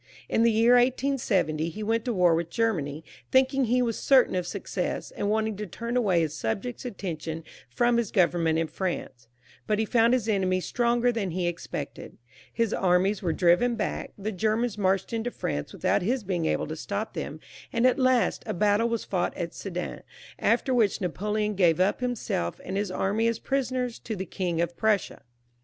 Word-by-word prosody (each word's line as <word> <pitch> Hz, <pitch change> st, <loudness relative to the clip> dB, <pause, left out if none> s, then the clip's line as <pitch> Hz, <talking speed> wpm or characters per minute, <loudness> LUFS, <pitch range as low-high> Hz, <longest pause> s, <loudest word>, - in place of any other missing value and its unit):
In -, -, +1 dB
the 235 Hz, -, +5 dB
year 225 Hz, +2 st, +5 dB
1870 240 Hz, -, +1 dB
he 215 Hz, +6 st, -6 dB
went 225 Hz, +1 st, 0 dB
to 245 Hz, -, 0 dB
war 180 Hz, -2 st, +4 dB
with 165 Hz, 0 st, -1 dB
Germany, 165 Hz, -9 st, -1 dB, 0.3 s
thinking 265 Hz, 0 st, +3 dB
he 250 Hz, +2 st, +2 dB
was 230 Hz, -2 st, -2 dB
certain 265 Hz, -2 st, +4 dB
of 180 Hz, -1 st, -1 dB
success, 185 Hz, -1 st, -3 dB
and 205 Hz, -, -2 dB
wanting 220 Hz, 0 st, 0 dB
to 210 Hz, 0 st, -5 dB
turn 235 Hz, +7 st, -5 dB
away 195 Hz, -9 st, +3 dB
his 155 Hz, -2 st, -1 dB
sub 130 Hz, -, -2 dB
jects' 245 Hz, 0 st, -6 dB
attention 165 Hz, -7 st, -5 dB, 0.3 s
from 240 Hz, -, +2 dB
his 235 Hz, -4 st, 0 dB
government 170 Hz, -4 st, +2 dB
in 165 Hz, -, +1 dB
France; 160 Hz, -9 st, -4 dB, 0.4 s
but 210 Hz, -, +2 dB
he 220 Hz, -, +1 dB
found 230 Hz, +1 st, +3 dB
his 235 Hz, -4 st, -2 dB
enemies 185 Hz, -3 st, +1 dB
stronger 240 Hz, 0 st, +2 dB
than 220 Hz, -5 st, -2 dB
he 180 Hz, +1 st, -2 dB
expected. 175 Hz, 0 st, -6 dB, 0.3 s
His 230 Hz, -3 st, 0 dB
armies 190 Hz, +2 st, +2 dB
were 175 Hz, -4 st, 0 dB
driven 180 Hz, +9 st, +3 dB
back, 215 Hz, -, -3 dB
the 210 Hz, +2 st, -3 dB
Germans 220 Hz, +3 st, 0 dB
marched 195 Hz, +1 st, 0 dB
into 230 Hz, +1 st, -1 dB
France 75 Hz, -, -4 dB
with -, -, -9 dB
out -, -, +3 dB
his 235 Hz, +6 st, 0 dB
being 175 Hz, -4 st, -1 dB
able -, -, 0 dB
to -, -, -5 dB
stop -, -, -4 dB
them, -, -, -5 dB, 0.3 s
and 235 Hz, -2 st, +1 dB
at 255 Hz, +2 st, +4 dB
last 255 Hz, -2 st, +2 dB
a -, -, -2 dB
battle 210 Hz, +5 st, +2 dB
was 230 Hz, -1 st, -2 dB
fought 185 Hz, -3 st, -1 dB
at 170 Hz, -2 st, -4 dB
Sedan, 180 Hz, -2 st, -5 dB, 0.4 s
after 260 Hz, -, +2 dB
which 220 Hz, -6 st, +2 dB
Napoleon 210 Hz, +3 st, -1 dB
gave 175 Hz, -4 st, +3 dB
up 185 Hz, +2 st, +2 dB
himself 240 Hz, -, -2 dB
Mid 190 Hz, -, -4 dB
his 200 Hz, 0 st, -1 dB
anny 205 Hz, +5 st, 0 dB
as 230 Hz, -1 st, 0 dB
prisoners 255 Hz, -2 st, -2 dB
to 220 Hz, -, -5 dB
the 190 Hz, -1 st, -4 dB
King 175 Hz, -2 st, -2 dB
of 170 Hz, 0 st, -2 dB
Prussia. 220 Hz, -2 st, 0 dB
210 Hz, 190 wpm, -27 LUFS, 180-235 Hz, 0.4 s, the